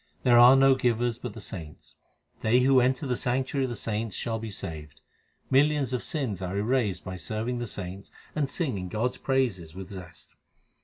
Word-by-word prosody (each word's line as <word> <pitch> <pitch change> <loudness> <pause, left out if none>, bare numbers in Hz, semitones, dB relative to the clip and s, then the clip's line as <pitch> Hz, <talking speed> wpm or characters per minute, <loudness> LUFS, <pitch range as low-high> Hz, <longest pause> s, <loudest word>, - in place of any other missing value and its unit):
There 120 -2 +6
are 125 +2 +9
no 135 0 +6
givers 120 -2 0
but 125 -4 -6
the - - -7
saints. 80 -6 -9 0.5
They 120 +3 +4
who 130 0 +5
enter 130 +3 +1
the 125 -2 0
sanctuary 130 +3 0
of - - -3
the 120 - -4
saints 110 0 -3
shall 115 -2 -2
be 110 0 -5
saved. 80 -7 -7 0.5
Millions 140 -1 +3
of 125 - -1
sins 130 - -3
are 95 +1 -3
erased 105 -4 0
by 95 0 -5
serving 110 +6 -3
the 120 - -3
saints 95 -1 -7 0.2
and 145 -3 0
singing 105 - -2
God 115 +6 0
s 125 - -11
praises 110 - -1
with 95 +1 -8
zest. 90 -4 -10
120 Hz, 190 wpm, -27 LUFS, 95-130 Hz, 0.5 s, are